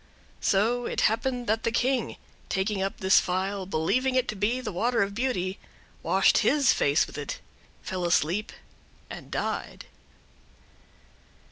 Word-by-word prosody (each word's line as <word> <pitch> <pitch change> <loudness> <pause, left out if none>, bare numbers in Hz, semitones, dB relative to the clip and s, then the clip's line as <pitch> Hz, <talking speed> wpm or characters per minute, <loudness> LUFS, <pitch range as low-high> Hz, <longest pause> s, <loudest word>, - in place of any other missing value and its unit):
So 230 +5 +1
it - - -1
happened 245 +3 0
that 220 0 0
the 230 - -1
King, 250 +1 0 0.3
taking 195 +1 -1
up 195 +1 -2
this 190 0 +5
phial, 190 +1 -2
believing 250 +10 0
it 255 -1 +2
to 215 - -2
be 210 +6 0
the 245 -4 -5
water 230 +4 +1
of 200 0 -4
beauty, 200 -6 -2 0.4
washed - - +3
his 285 -3 +3
face 145 +3 +2
with - - -9
it, 145 - -5 0.4
fell 185 -1 -4
asleep, 175 +5 +1 0.6
and—died. - - -4
210 Hz, 135 wpm, -27 LUFS, 190-245 Hz, 0.6 s, this